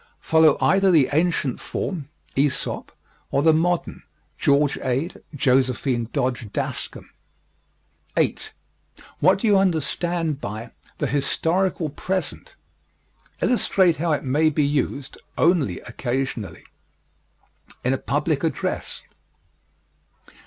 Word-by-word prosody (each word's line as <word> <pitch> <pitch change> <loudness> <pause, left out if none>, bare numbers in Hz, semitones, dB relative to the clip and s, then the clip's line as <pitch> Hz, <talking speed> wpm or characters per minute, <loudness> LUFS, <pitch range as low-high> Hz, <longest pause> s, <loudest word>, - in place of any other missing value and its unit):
Follow 160 -2 +4
either 195 0 +4
the 155 -7 +5
ancient 155 -5 +1
form 155 -8 -4 0.3
(Æsop) 140 0 0 0.4
or 140 - +1
the 160 0 +6
modern 175 +2 0 0.3
(George 140 0 +2
Ade, 130 +6 -2
Josephine 130 -2 +1
Dodge 120 -4 -2
Daskam). - - -4 1.1
8. - - 0 0.7
What 185 +5 +5
do 200 - -3
you 205 -3 +5
understand 165 -3 0
by 110 +3 -6 0.3
"the - - -1
historical 165 +4 0
present?" 185 +6 -4 0.9
Illustrate 190 -8 +3
how 170 +1 0
it 150 - 0
may 145 +4 +3
be 150 -1 +1
used 140 -1 -2 0.2
(ONLY 170 -4 +2
occasionally) 120 -8 -4 1.2
in 125 - +2
a 135 - -1
public 150 +1 -1
address. 160 -5 -2
150 Hz, 105 wpm, -23 LUFS, 135-170 Hz, 1.2 s, the